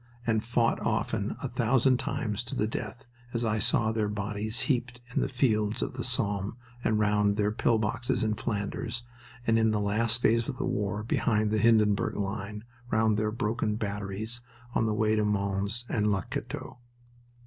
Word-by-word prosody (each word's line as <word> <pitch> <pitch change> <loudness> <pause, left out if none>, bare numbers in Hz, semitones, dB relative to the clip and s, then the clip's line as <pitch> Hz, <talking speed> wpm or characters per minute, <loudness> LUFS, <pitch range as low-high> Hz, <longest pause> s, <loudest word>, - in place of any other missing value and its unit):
and 110 -1 +2
fought 115 0 +2
often, - - -1
a - - 0
thousand 125 +2 +3
times, 110 -4 -2
to 120 - -6
the 105 - +1
death, 115 +2 -5 0.3
as 115 0 0
I 110 -1 +1
saw 110 +1 +2
their 110 -2 0
bodies 105 +2 -2
heaped 125 -3 0
in - - +2
the - - 0
fields 110 -5 +1
of - - -3
the 125 -1 -4
Somme 105 -3 -1 0.3
and 110 - +2
round 105 -1 +3
their 105 0 +1
pill 115 +1 +2
boxes 115 +2 0
in 110 -1 +1
Flanders 115 +2 -3 0.4
and 115 -1 +4
in 110 0 +4
the 105 -1 +1
last 110 +3 +2
phase 115 0 +3
of 130 - -4
the - - -1
war 105 -4 -1
behind 110 -2 +1
the 110 - +2
Hindenburg 105 -2 +4
line 105 +1 -3 0.3
round 110 -1 +3
their 105 0 +1
broken 110 -1 -1
batteries 105 +2 -3 0.3
on 110 - +2
the 110 - +1
way 110 0 +2
of 105 - +2
Mons 100 +3 -1
and 105 -2 +1
Le 95 -3 0
Cateau. - - -5
110 Hz, 180 wpm, -29 LUFS, 105-115 Hz, 0.4 s, and